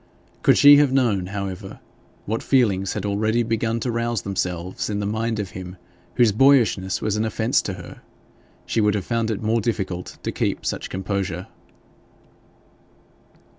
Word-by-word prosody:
Could - - +4
she 145 0 +9
have 145 -2 +4
known, 115 -9 +1
however, 100 -1 -6 0.5
what 110 +2 -2
feelings 100 -8 +2
had - - -4
already 110 +3 +1
begun 115 0 -1
to 125 - -1
rouse 115 -1 -1
themselves 90 -2 -3
in 105 -1 -2
the 100 - -2
mind 110 +2 -1
of 100 -2 -4
him 90 -1 -8 0.4
whose 120 -3 +4
boyishness 110 -6 +3
was 110 -1 0
an 110 - 0
offence 110 +4 +1
to 95 - -4
her, 90 -2 -11 0.6
she 115 - 0
would 105 0 +2
have 100 -3 -3
found 115 -1 -1
it 110 -1 -3
more 110 +1 +1
difficult 95 -5 -3
to - - -2
keep - - -2
such - - -3
composure. 95 -1 -3
105 Hz, 160 wpm, -22 LUFS, 95-115 Hz, 0.6 s, she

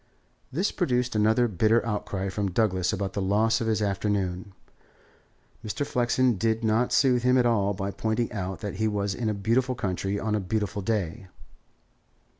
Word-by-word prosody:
This 180 +10 0
produced 125 - 0
another 110 +3 +3
bitter 110 +4 +2
outcry 100 -3 -3
from 100 +1 -2
Douglas 95 -2 +1
about 100 -2 -3
the 100 - -2
loss 105 +5 +2
of 115 - -1
his 110 -1 +1
afternoon. 100 -2 -2 1.1
Mr. 110 +6 -3
Flexen 125 -2 +1
did 115 +2 0
not 110 +3 +2
soothe 125 -3 +3
him 125 +1 +3
at 125 - +3
all 100 -4 +2
by 100 +1 -3
pointing 110 +3 -1
out 95 -4 -4
that 100 -3 -5
he 110 - +1
was 100 -2 -1
in 115 +1 -2
a 105 - -1
beautiful 125 +6 +1
country 100 -2 -2
on 110 +1 -2
a 105 - +1
beautiful 100 0 -2
day. 100 -1 -2
105 Hz, 170 wpm, -26 LUFS, 100-115 Hz, 1.1 s, another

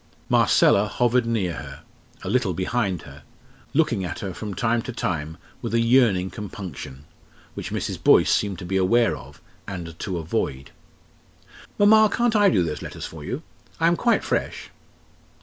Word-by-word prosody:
Marcella 100 +2 +4
hovered 120 +2 +1
near 100 -7 0
her 70 -2 -9 0.4
a - - -6
little 115 -7 +1
behind 95 -1 -1
her 70 +1 -12 0.5
looking 130 -10 +1
at 90 - -4
her 95 -3 -4
from 105 +1 -6
time 120 0 +1
to 125 - -6
time 80 -8 -3 0.2
with - - -2
a - - +4
yearning 115 -6 +3
compunction 90 - -8 0.5
which - - -6
Mrs. - - -4
Boyce - - +5
seemed 100 -3 0
to 90 - -8
be 95 +2 -1
aware 115 +6 +3
of, 70 +4 -13 0.2
and 85 -4 -7
to 95 -3 -3
avoid. 70 -4 -3 1.1
"Mamma, 215 +1 +6
can't 240 0 +1
I 205 -1 +5
do 95 -6 +2
those 80 -3 -4
letters - - -7
for 80 -2 -9
you? 125 - -5 0.4
I 165 - +2
am 170 +1 +4
quite 235 +6 +2
fresh." - - -3
100 Hz, 165 wpm, -24 LUFS, 85-120 Hz, 1.1 s, Mamma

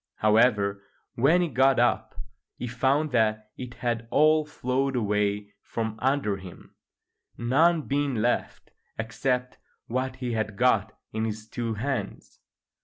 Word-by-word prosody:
However, 105 -2 +3 0.3
when 160 +9 +3
he - - 0
got 130 -1 +3
up 120 +1 +1 0.4
he - - -5
found 135 +5 +1
that 110 -2 +1
it 125 -1 -8
had 115 -1 -2
all 155 +2 +4
flowed 135 -1 -1
away 105 -2 0
from 110 -1 -4
under 130 -6 +1
him, 95 -2 -12 0.6
none 155 +7 +3
being 140 -1 -1
left 115 +2 -1 0.3
except 125 +3 -2 0.3
what 130 +2 -2
he 125 -2 -4
had 105 -2 -2
got 110 -3 +2 0.2
in 110 +1 -1
his 110 0 -5
two 115 -1 -3
hands. 135 +5 -4
120 Hz, 130 wpm, -26 LUFS, 110-135 Hz, 0.6 s, all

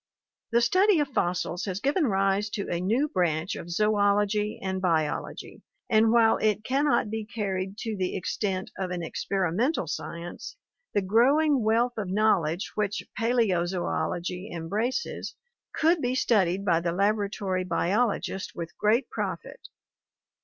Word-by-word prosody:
The 235 +1 +4
study 370 - +4
of 290 -2 0
fossils 180 -6 -1
has 190 -1 -3
given 285 - +1
rise 195 0 +1
to 200 - -3
a 170 - -1
new 230 +11 +1
branch 175 - 0
of 170 - -8
Zoology 210 +2 +1
and 190 -1 -3
Biology, 160 -5 -2 0.3
and 220 0 +5
while 230 -1 +5
it 215 -1 +1
can 270 +5 +1
not 230 -7 +2
be 220 0 -3
carried 195 -3 -3
to 225 -2 -3
the 185 -2 -2
extent 190 0 -2
of 190 -1 -2
an 180 -1 -3
experimental 195 - -1
science, 170 - -6 0.4
the 205 - +2
growing 270 +8 +3
wealth 230 +3 +2
of 200 - -3
knowledge 190 -3 +1
which 205 -3 -1 0.2
Paleozoology 185 -4 0
embraces 210 - -3 0.4
could 325 +1 +2
be 250 +1 0
studied 195 -6 +2
by 170 -4 +3
the 170 0 -2
laboratory 200 -1 0
biolo 195 +6 +1
gist 190 - -6
with 170 -1 -6
great 225 +5 +2
profit. - - -5
205 Hz, 140 wpm, -27 LUFS, 180-230 Hz, 0.4 s, and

